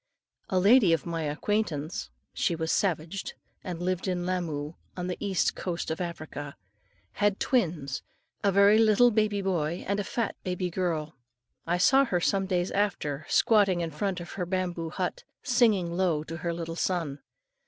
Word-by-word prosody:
A 185 - +1
lady 200 -1 +6
of 160 -4 0
my 165 -1 -3
acquaintance, 165 +1 -2 0.2
she 170 - 0
was 160 0 -2
a - - +2
savage, 180 0 -1 0.3
and 175 -2 -5
lived 185 +1 -1
in 180 -1 -1
Lamoo 160 -5 -2 0.2
on 180 - -3
the 180 0 -3
East 195 -3 +1
Coast 170 -3 -3
of 160 - -3
Africa, 155 -4 -6 0.6
had 205 -1 +1
twins, 160 - 0 0.4
a 200 - +4
very 200 +3 +6
little 225 +2 +5
baby 210 -2 +1
boy 170 -3 -1
and 200 +1 0
a - - +2
big 195 - -7
fat 235 - -2
baby 180 -1 -2
girl. 165 -4 -2 0.5
I 175 +1 +2
saw 270 +9 +5
her 180 -8 0
some 195 +2 +1
days 180 -1 0
after, 155 -8 -1
squatting 205 -6 +4
in 165 -1 -3
front 185 +4 -2
of 175 -1 -8
her 180 - -3
bamboo 175 -3 -2
hut, - - -3 0.2
and - - -16
singing 225 -9 +3
low 175 -5 +1
to 165 +1 -6
her 170 +1 -2
little 165 -1 -4
son. 165 -6 -1
180 Hz, 175 wpm, -28 LUFS, 165-200 Hz, 0.6 s, lady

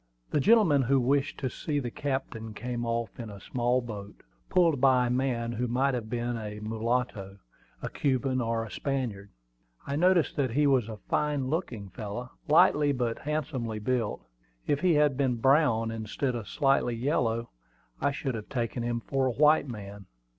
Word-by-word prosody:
The - - +2
gentleman 190 -6 +5
who 135 +2 +3
wished 140 +3 +1
to 130 - 0
see 150 +2 -3
the 125 -4 -2
captain 115 -6 -4
came 120 0 -4
off 115 -1 -2
in 115 -2 -6
a 100 -1 -9
small 125 +3 0
boat, 105 -4 -8 0.3
pulled 165 -7 +3
by 130 -2 +5
a - - -1
man 125 -2 0
who 120 +1 -2
might 130 +3 +1
have 115 -3 -3
been 120 0 -2
a 105 -1 -6
mulatto, 110 -2 -2 0.5
a - - -2
Cuban, 130 -1 0
or 115 -1 -1
a 110 - -11
Spaniard. 120 -8 -3 0.6
I 140 - -3
noticed 180 +1 +3
that 135 -3 +1
he 145 +3 +3
was 130 -5 +3
a 110 - -6
fine 145 +3 -1
looking 120 - -3
fellow, 110 +6 -6 0.2
lightly 150 -1 +5
but 120 -4 -1
handsomely 145 -7 -3
built. 115 - -2 0.4
If 145 - +1
he 175 0 +3
had 150 -3 +3
been 130 -3 +1
brown, 120 -3 +3
instead 115 +4 -2
of 115 -4 -5
slightly 135 -3 +2
yellow, 115 -3 0 0.5
I - - +3
should 135 -1 -3
have 110 -2 -6
taken 120 -2 -2
him 120 0 -2
for 135 +2 0
a - - +1
white 150 +2 +4
man. 100 -4 -8
125 Hz, 175 wpm, -28 LUFS, 115-140 Hz, 0.6 s, gentleman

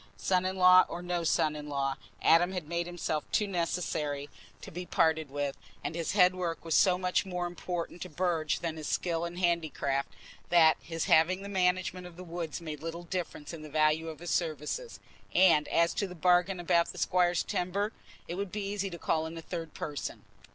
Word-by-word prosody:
Son 180 - +1
in 190 - -2
law 185 0 +8
or 175 - -5
no 175 -1 -1
son 155 -1 +2
in 150 0 -7
law, 135 -1 -1 0.3
Adam 175 +3 +5
had 180 -5 -4
made 170 +1 -2
himself 170 -3 -2
too 210 - +2
necessary 165 -6 -2 0.3
to - - -10
be 180 +2 -5
parted 160 -3 +1
with, 145 0 -2 0.3
and - - -3
his 165 -1 -2
headwork 180 -4 +2
was 165 - -1
so 180 +1 +5
much 180 0 +1
more 180 -2 -3
important 175 0 -5
to - - -5
Burge 165 -2 0
than 165 -2 -3
his 155 - -5
skill 170 -1 0
in 170 +1 -6
handicraft 155 - 0 0.4
that 160 -2 +6
his 165 -1 -3
having 185 +4 +4
the 200 - -6
management 185 -1 0
of 175 -1 -14
the 185 - -8
woods 170 -3 -5
made 155 -3 -7
little 165 +1 -5
difference 170 -3 -5
in 165 - -7
the 155 - -9
value 155 +2 +2
of 155 - -7
his 175 0 -5
services; 165 - -2 0.4
and 175 -5 +5
as 170 0 +2
to 200 - -1
the 180 - -9
bargains 180 +2 +3
about 170 -1 +3
the - - -8
squire's 175 0 +2
timber, 200 +4 -1 0.4
it - - -4
would 195 +1 -4
be 210 -1 -3
easy 200 0 -2
to 170 - -7
call 160 -1 0
in 165 +1 -8
a - - -4
third 165 -3 -6
person. 145 -2 -5
170 Hz, 200 wpm, -30 LUFS, 160-180 Hz, 0.4 s, law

